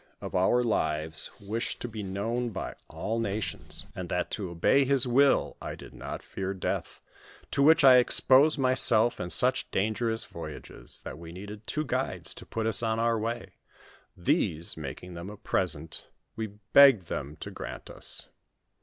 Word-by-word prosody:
1$ 120 +7 +1
lives 80 -7 0
wished 110 +4 -3
to - - -4
be 110 -2 -6
known 110 +5 -2
by 100 - -5
all 115 +2 -3
nations, 110 -1 -4
and 90 -2 -6
that 90 - -2
to 100 -4 -3
obey 85 +11 +3
his 135 -1 +3
will, 135 +3 +3
I - - -5
did - - -12
not - - -7
fear 95 0 -4
death, 95 - -3 0.5
to 140 - +1
which 160 +2 +6
I 130 -2 +9
exposed 135 +4 +5
myself 125 -3 +4
in 90 - -4
such - - +2
dangerous 110 +3 0
voyages; - - -6
that - - -8
we 85 -1 -9
needed 105 +4 -9
two 155 0 -1
guides - - -1
to - - -11
put 110 -1 -3
us 115 - +6
on 110 -1 0
our 115 0 +1
way, 115 +2 -4 0.6
these, 80 +2 0
making 80 +4 -7
them 85 +3 -7
a 105 - -9
present, 80 -5 -2 0.3
we 110 0 -3 0.3
begged 135 -8 +8
them 75 -3 -5
to - - -8
grant - - -8
us. - - -5
110 Hz, 165 wpm, -28 LUFS, 90-120 Hz, 0.6 s, I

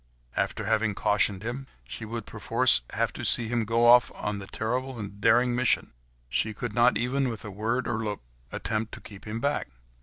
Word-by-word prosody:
After - - -1
having 110 -2 +1
cautioned 105 -1 +1
him, 125 +4 -5 0.2
she 110 - -7
would 115 0 -5
perforce 60 0 +3
have - - 0
to - - -7
see 115 -2 +4
him 120 -2 0
go 115 +2 +2
off 120 +1 +7
upon 105 -1 -4
his 95 - -9
terrible 125 +3 -2
and 100 -1 -8
daring 120 +3 +4
mission; 125 - +2 0.3
she 110 - -1
could 120 0 -4
not 120 +3 +4
even 130 +2 0
with 110 -3 -5
a 105 - -6
word 115 +6 -2
or 115 -2 -2
look, 105 -2 -4 0.3
attempt 110 0 -3
to - - -11
keep 100 -2 -12
him 110 +1 -4
back. 145 +4 -1
115 Hz, 200 wpm, -27 LUFS, 105-120 Hz, 0.3 s, off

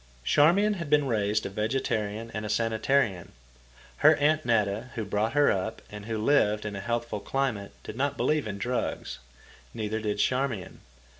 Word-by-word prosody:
Charmian 175 - +4
had 170 -4 -5
been 150 -1 +4
raised 105 -4 0
a - - -2
vegetarian 110 0 -2
and 110 - -4
a 105 - -4
sanitarian. 115 -3 0 0.6
Her - - +6
Aunt 155 +2 +2
Netta, 110 0 0
who 110 - -3
brought 105 +3 -1
her 145 0 +4
up 95 +4 -3
and 105 0 -8
who 115 -1 -2
lived 105 -3 +2
in 105 -1 -4
a - - -4
healthful 120 0 -2
climate, 120 -6 -2
did - - -7
not 140 +2 -1
believe 150 -6 +1
in 100 -1 -4
drugs. 120 - -3 0.6
Neither 110 0 -2
did 105 -1 -2
Charmian. 125 -4 -1
110 Hz, 165 wpm, -27 LUFS, 105-135 Hz, 0.6 s, Her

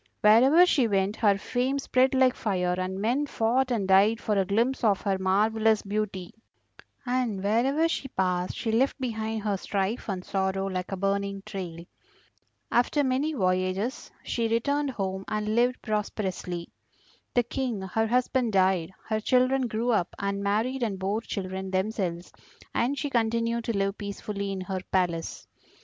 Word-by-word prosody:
Wherever 260 +11 +7
she 275 -9 +3
went 195 0 +1
her 205 -3 +3
fame 250 +6 -1
spread 265 -1 +2
like 260 -1 +4
fire, 180 -6 -1
and 185 +1 -3
men 250 +8 0
fought 250 +2 +1
and 220 -6 0
died 200 +4 +5
for 215 - -1
a 195 -1 +2
glimpse 235 +7 0
of 205 -4 +3
her 195 -2 0
marvellous 215 +3 +2
beauty; 200 -3 -3 0.7
and 245 -6 -1
wherever 260 +10 +2
she 330 -4 -3
passed 180 -6 -1
she 225 - -2
left 260 +6 +1
behind 220 -3 -3
her 205 -2 0
strife 200 +4 -2
and 185 -2 -3
sorrow 195 0 -1
like 185 -1 -3
a 195 - -2
burning 200 0 -1
trail. 170 -3 -6 0.9
After 245 +5 +2
many 275 +4 0
voyages 185 +2 -1
she 230 -1 -1
returned 280 +6 0
home 190 -5 -3
and 215 0 -1
lived 245 +2 +2
prosperously. 190 -5 -3 0.7
The 245 - +4
King 240 -4 -3
her 225 +4 0
husband 250 -1 +1
died, 185 -2 +2
her 215 -1 0
children 255 +3 +2
grew 230 +2 -1
up 185 -6 0
and 200 0 -2
married 220 +6 0
and 215 -5 -1
bore 195 +4 -1
children 190 -3 -5
themselves, 185 -3 -2 0.4
and 260 +4 0
she 285 +1 -3
continued 230 0 0
to 230 -3 -1
live 195 +1 -1
peacefully 200 0 -4
in 190 -1 -4
her 185 0 -3
palace. 175 -3 -1
215 Hz, 160 wpm, -27 LUFS, 190-245 Hz, 0.9 s, Wherever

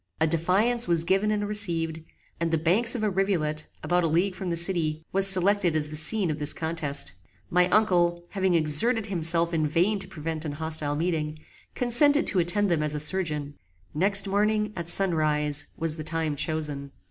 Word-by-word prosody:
A 160 - +2
defiance 185 +9 +1
was 170 -2 +2
given 195 +4 0
and 205 -1 -2
received, 165 -6 -1 0.4
and 170 0 -1
the 165 - +1
banks 195 +10 +2
of 225 - -4
a 215 - +1
rivulet, 170 -6 -2 0.2
about 175 0 0
a - - +1
league 175 +5 0
from 180 0 -6
the 170 - -2
city, 165 -3 +1
was 195 0 +7
selected 190 -2 +3
as 150 -1 -2
the 155 - -7
scene 170 +4 +1
of 150 - -5
this 150 0 +1
contest. 160 - -3 0.4
My 180 +1 +2
uncle, 175 -5 +1
having 190 -3 0
exerted 170 +9 +3
himself 170 -3 -1
in 155 -2 0
vain 180 +7 0
to 190 - -3
prevent 160 0 -5
an 150 -3 -5
hostile 155 -1 -2
meeting, 155 -1 -3 0.4
consented 285 +5 +3
to 190 - +1
attend 190 +3 0
them 165 -3 0
as 150 0 -2
a - - -3
surgeon. 150 -3 -1 0.4
Next 200 +5 +3
morning, 210 +1 0
at 170 -1 -5
sun 195 0 +1
rise, 150 -2 0
was 165 -1 0
the 155 - -6
time 160 -1 -3
chosen. 150 -2 -4
170 Hz, 190 wpm, -25 LUFS, 155-195 Hz, 0.4 s, was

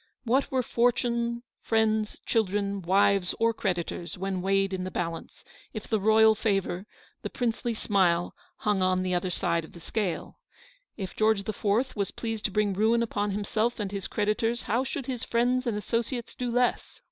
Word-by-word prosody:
"What 260 +3 +2
were 260 -1 +1
fortune, 235 0 +1 0.2
friends, 220 -1 +1
children, 200 -2 0
wives 190 +1 +3
or 230 0 +3
creditors, 175 -4 -3
when 190 0 -2
weighed 195 +1 +1
in 185 -1 -2
the 185 - -3
balance, 170 -2 -5 0.3
if 215 -3 -6
the 220 - +1
royal 220 +2 +6
favour, 195 -3 -1 0.3
the - - -4
princely 235 -1 -1
smile 180 -5 +2 0.2
hung 210 -6 0
on 185 0 +2
the 185 -1 -1
other 180 +1 0
side 170 -1 0
of 160 - -13
the 170 - -11
scale? 185 0 -3 0.6
If 190 -4 -5
George 215 -2 +2
the 215 - -3
Fourth 220 +7 0
was 200 -3 -1
pleased 225 -2 -4
to 210 - +1
bring 210 0 +1
ruin 225 +4 +3
upon 205 -2 -1
him 205 +1 -2
self 225 +4 0
and 200 -2 -2
his 200 -2 -4
creditors, 225 +2 0
how 235 +5 +1
should 265 0 -4
his 250 -3 -4
friends 245 +2 +1
and 220 -3 0
associates 235 +3 -2
do 250 -1 -3
less? 245 +1 0
210 Hz, 180 wpm, -28 LUFS, 195-235 Hz, 0.6 s, royal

